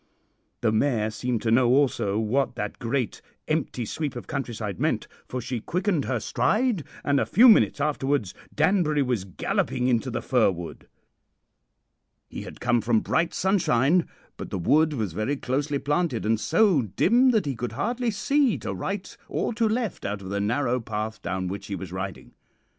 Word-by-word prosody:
The 115 - +2
mare 110 -2 +1
seemed 120 0 -2
to 110 - +1
know 120 +2 +5
also 125 -7 +2
what 115 +6 0
that 105 0 -4
great 120 0 -2 0.3
empty 150 -6 -1
sweep 145 +3 -3
of 120 - -6
countryside 110 -7 -4
meant, - - 0 0.2
for 130 - -4
she 125 0 -3
quickened 180 - -1
her 130 -3 -1
stride, 210 - +1 0.2
and 140 -1 +2
a - - +1
few 245 +5 +6
minutes 220 -9 +5
afterwards 140 -7 0 0.2
Danbury 155 -3 +2
was 120 -7 -1
galloping 125 +6 -1
into 125 +1 +1
the 120 - -3
fir 125 -6 +3
wood. 85 -3 -7 1.4
"He - - -7
had - - -10
come 120 -1 +2
from 115 -1 +2
bright 165 +1 0
sunshine, 175 -4 +2 0.3
but - - -7
the - - -3
wood 150 - +3
was 110 - -2
very 110 - -1
closely 140 +3 -1
planted, 145 -4 -1
and 110 0 +2
so 195 - +3
dim 235 - +3
that 220 -7 +2
he 140 -2 -2
could 115 -1 -4
hardly 235 - -1
see 270 +4 +2
to - - -4
right 195 -1 -4
or - - -1
to 225 -1 +1
left 230 -1 -2
out 100 0 -4
of 95 - -7
the 100 +1 -1
narrow 125 +4 0
path 110 -1 -4
down 95 +1 -3
which 95 +2 -5
he 100 - -3
was 95 -2 -7
riding. 95 0 -6
130 Hz, 175 wpm, -25 LUFS, 110-160 Hz, 1.4 s, few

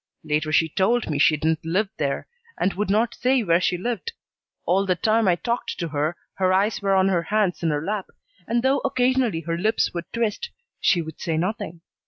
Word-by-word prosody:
Later 155 0 -1
she 160 +1 +4
told 195 +5 +1
me 145 - -1
she 155 +1 +5
didn't 160 +1 0
live 190 +6 0
there, 140 -2 -2 0.3
and 190 - +1
would 205 +1 -2
not 225 +4 +2
say 250 +1 +1
where 170 -2 +3
she 180 +1 +1
lived. 245 - -3 0.5
All 190 +2 +2
the 185 -2 +1
time 220 +4 +2
I 180 - +4
talked 235 +7 -3
to 170 -2 -3
her 150 +3 -1 0.2
her 185 -1 +1
eyes 200 +4 +1
were 195 -1 +2
on 190 0 +4
her 180 -3 +2
hands 200 +1 0
in 165 - +1
her 150 +1 -1
lap 205 -1 -2 0.4
and, 235 +1 0
though 270 +1 +3
occasionally 255 -8 +1
her 165 +1 -3
lips 215 +4 +1
would 170 0 -6
twist, 230 - -2 0.3
she 170 -2 +3
would 160 0 -10
say 160 -2 -1
nothing. 175 -2 -3
190 Hz, 210 wpm, -23 LUFS, 165-225 Hz, 0.5 s, she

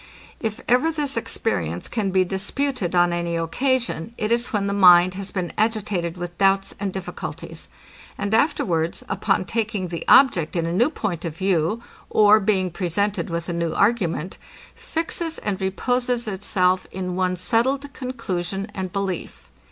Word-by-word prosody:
If 220 -1 -3
ever 255 +7 +3
this 295 -3 -2
experience 90 - -2
can 215 -4 -1
be 190 0 +3
disputed 200 +1 -2
on 175 0 +4
any 170 0 -1
occasion, 235 +3 -1
it 215 +1 -2
is 235 +1 +2
when 205 -2 -1
the 200 - -1
mind 180 -2 +7
has 195 +1 -6
been 180 -3 -3
agitated 205 -6 0
with 175 0 -7
doubts 195 0 +3
and 200 -1 -2
difficulties; 185 -1 -7 0.5
and 200 +1 -2
afterwards, 180 - +1
upon 195 -3 0
taking 210 -5 -2
the 170 -1 -4
object 180 - +5
in 170 -1 0
a 165 - -2
new 240 +10 +3
point 195 - -3
of 165 -2 -5
view, 190 +4 0 0.3
or 215 0 +6
being 190 -3 +1
presented 200 +4 -1
with 170 0 -3
a 175 - -2
new 170 -1 -1
argument, 190 -5 +1 0.3
fixes 330 0 -3
and 195 -2 -3
reposes 245 +5 0
itself 185 -2 +1
in 180 -1 -4
one 185 0 +1
settled 260 +10 0
conclusion 195 -6 -4
and 185 -2 -4
belief. 185 - -4
195 Hz, 155 wpm, -23 LUFS, 175-225 Hz, 0.5 s, mind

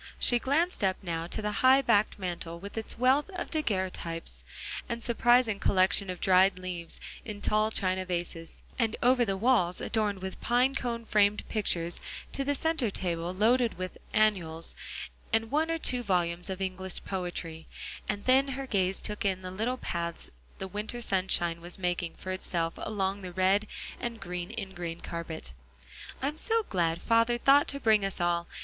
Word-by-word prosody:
She 245 - +4
glanced 310 - +1
up 190 -1 +2
now 165 -2 -2
to 215 - -3
the 210 - 0
high 265 +1 +7
backed 215 -4 +3
mantel 175 -3 -4
with 200 +4 -9
its 225 0 -5
wealth 260 - +3
of 350 - -4
daguerreotypes, 185 - -2 0.5
and 235 -1 -3
surprising 240 -2 +3
collection 190 +1 +3
of 180 -1 -4
dried 190 0 +5
leaves 180 -2 -5 0.2
in 210 -2 -6
tall 215 +1 +2
china 185 -3 0
vases; 175 -2 -4 0.2
and 230 -2 +2
over 250 0 +5
the 195 -4 -1
walls, 195 -6 +3
adorned 205 -4 -1
with 190 - -5
pine 250 +3 +3
cone 235 -3 -3
framed 210 -1 +3
pictures, 175 -6 -1 0.3
to 275 - 0
the 285 +1 0
center 320 -5 +1
table 175 -3 -2
loaded 230 +3 +3
with 185 0 -5
"Annuals," 180 -7 +1 0.6
and 225 0 +1
one 310 +3 +2
or 330 - +1
two 250 -6 +1
volumes 180 -4 0
of 190 0 -4
English 190 0 -3
poetry, 175 -4 -4 0.4
and 205 -1 -2
then 265 +2 +5
her 275 - -3
gaze 190 -5 +1
took 210 0 -4
in 190 -2 0
the 185 - -5
little 225 +7 -1
paths 170 -6 -4 0.3
the 190 - -5
winter 210 +5 -4
sunshine 185 -5 +1
was 175 +1 -5
making 175 -2 -1
for 185 - -6
itself 170 -3 -2
along 200 -1 -2
the 185 -1 -6
red 190 +4 +2 0.3
and 235 -1 -4
green 180 -1 -4
ingrain 190 -6 -5
carpet. 165 - -6 0.7
"I - - +2
am 300 +2 -3
so 450 +5 +1
glad 170 -2 0
father 230 +1 +3
thought 275 +4 +5
to 280 - -4
bring 220 -5 +4
us 195 -1 -2
all. 175 -1 +1
195 Hz, 170 wpm, -30 LUFS, 180-235 Hz, 0.7 s, high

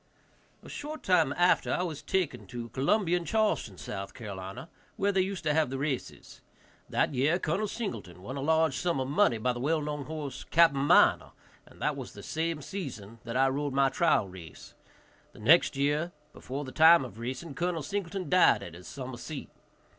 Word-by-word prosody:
A - - -12
short 305 +1 -7
time 180 -7 +3
after, 175 +3 +3
I 180 - 0
was 160 -5 -4
taken 135 - -2
to 120 +2 -6
Columbia 170 - +1
and 170 - -6
Charleston, 215 - 0
S.C., 100 +4 -7 0.7
where 200 +1 +1
they 195 -1 +2
used 190 0 -3
to 150 -1 +1
have 155 -4 +2
the 135 - -4
races. 135 -2 -4 0.5
That - - +1
year 140 +6 +2
Col. 185 +5 -1
Singleton 110 - -6
won 130 +7 -6
a 140 - -4
large 160 -1 +2
sum 170 -3 0
of 130 - -1
money 145 - +3
by 125 +3 0
the 120 - -6
well 155 +5 +1
known 150 -1 -4
horse, 150 -2 -6
Capt. 165 -3 +5
Miner, 140 +1 +4 0.3
and - - -18
that - - +1
was - - -8
the - - -11
same 160 0 -2
season 125 - -7
that 115 +1 -3
I 135 +1 +4
rode 140 +1 -2
my 135 0 +3
trial 135 - +2
race. 90 -3 -12 0.6
The - - -15
next - - +4
year, 145 +5 +1 0.2
before 140 +3 -6
the 130 - -8
time 160 -1 +6
of 115 -3 -11
racing, 130 +6 -5
Col. 170 +1 -2
Singleton 190 +2 -4
died 180 0 +4
at 85 - -9
his 90 +2 -12
summer 130 -3 -7
seat. 135 +5 -7
145 Hz, 190 wpm, -29 LUFS, 130-170 Hz, 0.7 s, time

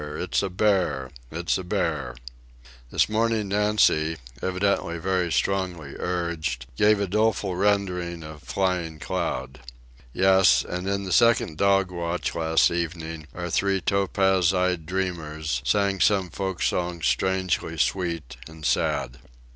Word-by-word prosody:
It's - - -1
a 100 - -2
bear! 90 -9 +1 0.2
It's 85 +5 -1
a - - -5
bear!" 80 - -2 0.7
This - - +2
morning 110 -1 0
Nancy, 100 -6 +2 0.2
evidently 95 -2 0
very 90 0 0
strongly 90 -8 -1
urged, 85 -8 -2
gave 105 - +4
a 100 - +1
doleful 105 -1 0
rendering 90 -4 0
of 75 -1 -10
Flying 90 -4 -1
Cloud. 65 -3 -3 0.5
Yes, 95 +4 +4
and 90 +2 -3
in 100 0 -1
the 95 - -5
second 115 -10 +3
dog 95 -1 +3
watch 85 0 -3
last 80 -1 +3
evening 80 -2 -4
our 90 -1 -4
three 95 +1 +1
topaz 95 -1 +2
eyed 90 -3 0
dreamers 80 -7 -2
sang 100 -2 +1
some 95 -3 +2
folk 95 -2 -3
song 85 -2 -1
strangely 95 -3 0
sweet 85 -6 -1
and 80 -1 -10
sad. 65 -1 0
90 Hz, 130 wpm, -25 LUFS, 80-95 Hz, 0.7 s, gave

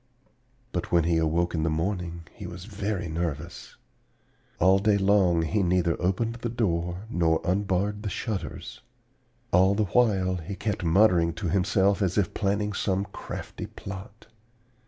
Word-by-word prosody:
"But 90 - -3
when 85 -1 +4
he 85 0 +2
awoke 85 +2 +1
in 80 - 0
the 80 - +1
morning 85 +1 -2
he 100 -5 -8
was 90 +1 -8
very 100 -3 -3
nervous. 85 0 -4 0.8
All 95 +2 +5
day 105 0 +3
long 95 -4 +3
he 105 +6 0
neither 90 -2 +2
opened 115 +6 0
the 120 0 -3
door 90 -5 -1
nor 85 -7 +1
unbarred 100 +2 0
the 105 - -3
shutters. 100 +2 -5 0.7
All 95 +3 +5
the 110 - +2
while 95 -4 +2
he 90 +4 -6
kept 105 -2 -3
muttering 85 -1 +4
to 85 +1 -3
himself 100 +2 +2
as 95 -1 0
if 100 -5 +1
planning 105 0 0
some 95 0 0
crafty - - -7
plot. 95 +2 -9
95 Hz, 150 wpm, -27 LUFS, 85-100 Hz, 0.8 s, All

